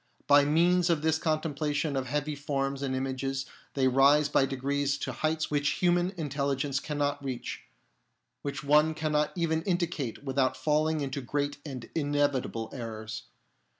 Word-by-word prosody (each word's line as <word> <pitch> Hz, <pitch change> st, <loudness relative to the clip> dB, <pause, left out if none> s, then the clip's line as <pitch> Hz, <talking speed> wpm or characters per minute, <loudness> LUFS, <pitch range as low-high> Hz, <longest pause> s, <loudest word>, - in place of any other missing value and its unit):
By 145 Hz, 0 st, +6 dB
means 175 Hz, +4 st, +3 dB
of 160 Hz, -3 st, +1 dB
this 160 Hz, 0 st, +2 dB
contemplation 155 Hz, -2 st, -1 dB
of 130 Hz, -1 st, -1 dB
heavenly 150 Hz, +2 st, -1 dB
forms 140 Hz, -1 st, -2 dB
and 135 Hz, -2 st, -1 dB
images 135 Hz, +1 st, -2 dB, 0.3 s
they 135 Hz, -2 st, +3 dB
rise 140 Hz, +3 st, +5 dB
by 135 Hz, -1 st, +3 dB
degrees 140 Hz, +1 st, -1 dB
to -, -, -3 dB
heights 155 Hz, 0 st, -1 dB
which 145 Hz, 0 st, +2 dB
human 175 Hz, 0 st, +2 dB
language 140 Hz, -2 st, -1 dB
cannot 145 Hz, -1 st, -2 dB
reach, 130 Hz, -3 st, -5 dB, 0.8 s
which 140 Hz, -1 st, -4 dB
one 150 Hz, +2 st, +4 dB
cannot 150 Hz, -1 st, +1 dB
even 160 Hz, -2 st, 0 dB
indicate 170 Hz, -, -2 dB
without 130 Hz, -1 st, +1 dB
falling 155 Hz, +3 st, +1 dB
into 140 Hz, 0 st, -3 dB
great 145 Hz, +3 st, -2 dB
and 130 Hz, -6 st, -7 dB
inevitable 145 Hz, -6 st, 0 dB
errors. 110 Hz, -3 st, -6 dB
145 Hz, 145 wpm, -29 LUFS, 135-155 Hz, 0.8 s, By